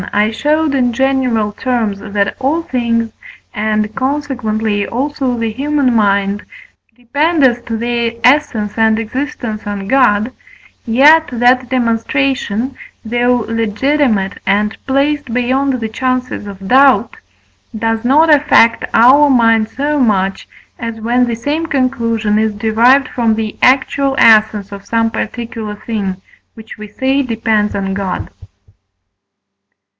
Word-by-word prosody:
I 210 Hz, +1 st, +2 dB
showed 300 Hz, +5 st, 0 dB
in 250 Hz, -3 st, +1 dB
general 255 Hz, -5 st, 0 dB
terms, 225 Hz, -3 st, -2 dB
that 200 Hz, -1 st, -2 dB
all 290 Hz, +6 st, -1 dB
things 230 Hz, -4 st, -2 dB, 0.4 s
(and 215 Hz, 0 st, -2 dB
consequently, 245 Hz, -7 st, -2 dB
also, 265 Hz, 0 st, -2 dB
the 230 Hz, -1 st, -2 dB
human 275 Hz, +1 st, 0 dB
mind) 200 Hz, -2 st, +1 dB, 0.5 s
depend 290 Hz, +6 st, 0 dB
as 240 Hz, -2 st, +3 dB
to 225 Hz, -, -3 dB
their 235 Hz, 0 st, -1 dB
essence 230 Hz, -6 st, +1 dB
and 220 Hz, 0 st, +3 dB
existence 225 Hz, -2 st, -5 dB
on 200 Hz, -1 st, -5 dB
God, 235 Hz, -2 st, +2 dB, 0.6 s
yet 295 Hz, +8 st, +5 dB
that 250 Hz, +1 st, +2 dB
demonstration, 255 Hz, 0 st, -1 dB, 0.3 s
though 240 Hz, +1 st, 0 dB
legitimate 225 Hz, -1 st, 0 dB
and 210 Hz, +2 st, +1 dB
placed 280 Hz, 0 st, 0 dB
beyond 260 Hz, +3 st, 0 dB
the 225 Hz, -, -3 dB
chances 255 Hz, -1 st, -3 dB
of 195 Hz, -1 st, -9 dB
doubt, 260 Hz, -2 st, +3 dB, 0.6 s
does 225 Hz, 0 st, -1 dB
not 305 Hz, +6 st, +4 dB
affect 280 Hz, -5 st, +3 dB
our 275 Hz, +5 st, +6 dB
mind 225 Hz, -4 st, +3 dB
so 290 Hz, +4 st, -2 dB
much, 195 Hz, -6 st, 0 dB, 0.3 s
as 230 Hz, -1 st, -5 dB
when 245 Hz, +3 st, +1 dB
the 235 Hz, -, -2 dB
same 295 Hz, +8 st, -3 dB
conclusion 230 Hz, -7 st, 0 dB
is 220 Hz, -1 st, -1 dB
derived 235 Hz, +5 st, +3 dB
from 230 Hz, -3 st, 0 dB
the 220 Hz, -1 st, -4 dB
actual 270 Hz, +1 st, +2 dB
essence 215 Hz, -2 st, +4 dB
of 200 Hz, -1 st, -9 dB
some 225 Hz, +1 st, 0 dB
particular 225 Hz, -2 st, -5 dB
thing, 205 Hz, -3 st, -4 dB, 0.4 s
which 225 Hz, -1 st, -12 dB
we 215 Hz, -, -8 dB
say 265 Hz, +6 st, -1 dB
depends 225 Hz, -4 st, -1 dB
on 195 Hz, -1 st, -2 dB
God. 195 Hz, -2 st, -4 dB
230 Hz, 125 wpm, -14 LUFS, 215-265 Hz, 0.6 s, our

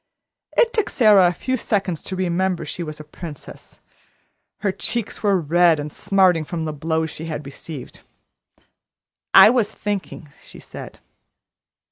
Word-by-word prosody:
It 470 Hz, -1 st, +4 dB
took 435 Hz, -, 0 dB
Sara 210 Hz, -6 st, +5 dB
a -, -, +2 dB
few 260 Hz, +9 st, -2 dB
seconds 195 Hz, -7 st, -1 dB
to 190 Hz, -, -4 dB
remember 185 Hz, 0 st, -1 dB
she -, -, -6 dB
was 155 Hz, -2 st, -6 dB
a -, -, -8 dB
princess. 155 Hz, -1 st, -11 dB, 0.8 s
Her 205 Hz, -2 st, +1 dB
cheeks 230 Hz, +3 st, -3 dB
were 200 Hz, -3 st, +2 dB
red 170 Hz, 0 st, +3 dB
and 145 Hz, 0 st, -6 dB
smarting 185 Hz, -4 st, +2 dB
from 165 Hz, +1 st, -4 dB
the 155 Hz, -, -3 dB
blows 160 Hz, +1 st, -2 dB
she 160 Hz, -, -8 dB
had 150 Hz, -2 st, -5 dB
received. 140 Hz, 0 st, -9 dB, 1.3 s
"I -, -, +10 dB
was 230 Hz, -4 st, +1 dB
thinking," 200 Hz, -8 st, -5 dB
she -, -, -12 dB
said. -, -, -10 dB
175 Hz, 145 wpm, -21 LUFS, 160-200 Hz, 1.3 s, I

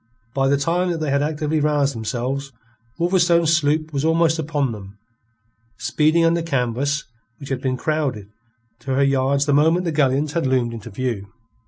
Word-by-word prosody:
By 135 Hz, -1 st, +1 dB
the 140 Hz, +1 st, +3 dB
time 175 Hz, +5 st, 0 dB
that 170 Hz, -, -1 dB
they 155 Hz, -3 st, -2 dB
had 140 Hz, 0 st, +2 dB
actively 150 Hz, +1 st, -1 dB
roused 145 Hz, -2 st, +1 dB
themselves, 130 Hz, +4 st, -3 dB, 0.5 s
Wolverstone's 170 Hz, -2 st, +3 dB
sloop 155 Hz, 0 st, 0 dB
was 140 Hz, 0 st, -1 dB
almost 165 Hz, 0 st, +2 dB
upon 145 Hz, -4 st, -1 dB
them, 100 Hz, -2 st, -10 dB, 0.8 s
speeding 155 Hz, +2 st, +2 dB
under 170 Hz, +1 st, +2 dB
canvas 140 Hz, -1 st, -1 dB, 0.3 s
which 140 Hz, -, -10 dB
had 135 Hz, -2 st, -2 dB
been 130 Hz, -1 st, -1 dB
crowded 140 Hz, -9 st, -2 dB, 0.5 s
to 135 Hz, -1 st, -3 dB
her 140 Hz, -, +3 dB
yards 140 Hz, +1 st, +2 dB
the 145 Hz, -, +1 dB
moment 160 Hz, +5 st, +3 dB
the 165 Hz, -, 0 dB
galleons 145 Hz, 0 st, +1 dB
had 165 Hz, -5 st, 0 dB
loomed 125 Hz, -3 st, +1 dB
into 115 Hz, 0 st, -8 dB
view. 105 Hz, -3 st, -4 dB
145 Hz, 170 wpm, -21 LUFS, 130-160 Hz, 0.8 s, the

